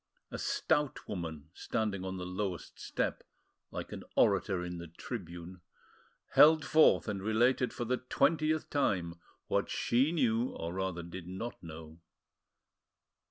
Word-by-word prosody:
A - - -5
stout 150 -3 0
woman, 80 -4 -5
standing 100 -3 -2
on 95 0 -4
the 90 - -5
lowest 90 0 -4
step, - - -2 0.5
like - - -6
an - - -6
orator 90 -2 +3
in 90 -1 -5
the 85 - -7
tribune, 85 -1 -7 0.7
held 155 +1 +7
forth 155 -5 +5
and 100 -3 -2
related 120 +5 +2
for 120 - -4
the 125 +2 +1
twentieth 155 +4 +1
time 90 - 0 0.3
what - - 0
she 130 +6 +2
knew, 125 -6 +1
or 85 +1 -4
rather, 95 -2 -2
did 85 +1 -8
not 95 +6 -6
know. 80 -1 -10
95 Hz, 135 wpm, -32 LUFS, 85-125 Hz, 0.7 s, held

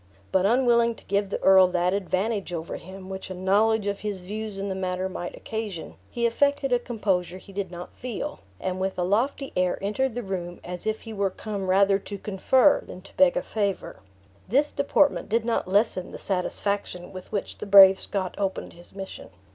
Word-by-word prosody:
But 190 +1 +3
unwilling 235 -1 +3
to - - -15
give 200 0 0
the - - -2
earl 190 -1 +7
that 180 0 +1
advantage 200 +1 -1
over 165 -1 -4
him 190 +1 -11
which 190 0 -7
a 185 - -5
knowledge 205 +4 +2
of 200 -1 -2
his 205 -3 -4
views 210 +2 -5
in 195 +1 -3
the 195 - -2
matter 185 0 -2
might 175 -1 -6
occasion, 215 -7 -5 0.2
he 235 -1 -1
affected 280 +3 +1
a 245 - +4
composure 195 -7 -1
he 195 +1 -14
did 195 -1 -3
not 175 0 -9
feel; 245 -4 -5 0.2
and 185 0 -3
with 190 0 -2
a 180 - 0
lofty 245 +9 0
air 180 0 +1
entered 225 +5 -1
the 245 - -3
room 175 -3 -5
as 180 +3 -2
if 220 0 -1
he 225 - -8
were 200 -2 0
come 200 0 -5
rather 195 +1 +4
to 200 0 -7
confer 250 +9 +3
than 185 - -11
to 195 - -17
beg 275 -2 +4
a - - 0
favor. 200 -3 -2 0.5
This 280 +8 +2
deportment 280 0 +2
did 225 +1 +1
not 230 -5 0
lessen 195 -1 +2
the - - -8
satisfaction 190 -1 -2
with 185 -1 -10
which 205 -2 -4
the - - -6
brave 195 -1 +9
Scot 190 -3 -2
opened 195 -1 -2
his 175 +2 -16
mission. 195 -1 -8
200 Hz, 200 wpm, -26 LUFS, 185-220 Hz, 0.5 s, brave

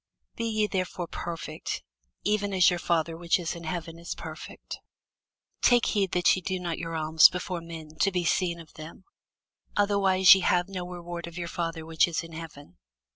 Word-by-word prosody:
Be 230 - -3
ye 215 -2 +1
therefore 185 -2 -2
perfect, 165 -2 -5 0.4
even 205 -1 0
as 180 -1 +6
your 175 - -1
Father 165 -1 0
which 170 0 +1
is 170 -3 -3
in 170 -1 -9
heaven 165 0 -5
is 170 - -5
perfect. - - -9 0.8
Take 245 -1 +5
heed 200 -4 0
that 180 0 +4
ye 185 - -4
do 185 +1 -2
not 175 -2 -3
your 165 0 -4
alms 160 0 +6
before 180 -1 -4
men, 165 -2 -9
to 195 - +3
be 180 -2 -1
seen 170 0 +1
of 165 -2 -13
them: 155 +4 -11 0.7
otherwise 195 -2 +6
ye 190 - +2
have 180 0 +2
no 185 -2 -5
reward 175 -1 -6
of 170 0 -10
your 170 -1 -3
Father 165 -1 -4
which 160 +1 +3
is 170 -1 -2
in 165 - -11
heaven. 155 - -10
175 Hz, 185 wpm, -27 LUFS, 165-185 Hz, 0.8 s, as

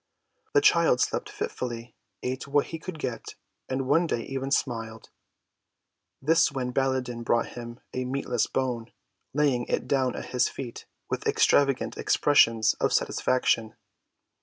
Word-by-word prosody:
The 425 - +6
child 425 +4 +4
slept - - 0
fitfully, 120 - -5 0.3
ate 130 +2 -3
what 145 +1 +2
he 165 - -3
could 175 0 -7
get, 125 -6 -5 0.3
and 130 0 -2
one 165 +5 +3
day 120 - -1
even 135 0 -4
smiled. 115 -5 -2 1.1
This 165 +4 +3
when 130 -2 -3
Baladan 130 -3 0
brought 115 0 +1
him 120 0 -9
a 130 - -2
meatless 125 -2 -1
bone, 125 -3 -2 0.4
laying 135 -4 +1
it - - -1
down 130 -3 +1
at - - -7
his 125 - +3
feet 125 -4 -8 0.2
with - - -3
extravagant 140 -2 +3
expressions 115 -6 +4
of - - +1
satisfaction. 115 -3 +1
130 Hz, 135 wpm, -27 LUFS, 120-140 Hz, 1.1 s, The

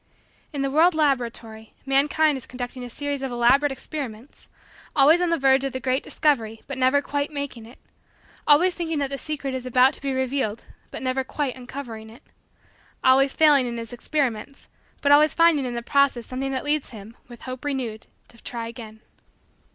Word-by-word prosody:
In 285 -3 -3
the 275 - -1
world 325 +4 +4
laboratory, 235 -7 -2
mankind 290 +3 +2
is 260 - -7
conducting 250 0 -6
a 245 - -7
series 285 +2 -4
of 270 -1 -3
elaborate 245 +4 +3
experiments 265 -3 -8 0.5
always 305 +5 +5
on 355 - +1
the 335 - +2
verge 270 -1 +3
of 275 - -3
the 260 - -3
great 260 +1 0
discovery 225 -7 -1
but 275 -2 -6
never 260 +3 +3
quite 285 +1 -2
making 280 -6 -6
it 240 - -15 0.7
always 345 +5 +5
thinking 330 -3 -3
that 280 -1 -1
the 275 - -4
secret 290 -3 -3
is 260 -1 -4
about 255 +2 +4
to - - -5
be 275 -1 -2
revealed 260 -4 -2 0.3
but - - -7
never 260 +1 0
quite 270 0 -3
uncovering 245 -4 -8
it 225 - -16 0.8
always 265 +1 +4
failing 290 -5 +5
in 235 -1 -4
his 230 0 -7
experiments 265 -1 -3 0.3
but 285 - +2
always 300 +1 +5
finding 330 -5 +4
in 245 -1 -4
the 235 - -4
process 280 -3 +2
something 270 +1 -4
that 265 +1 -3
leads 295 -1 0
him, 220 0 -11
with 240 -2 -13
hope 255 -1 -7
renewed, 255 -6 -4 0.2
to 235 - -19
try 230 -2 -5
again. 220 -2 -10
265 Hz, 185 wpm, -24 LUFS, 240-285 Hz, 0.8 s, always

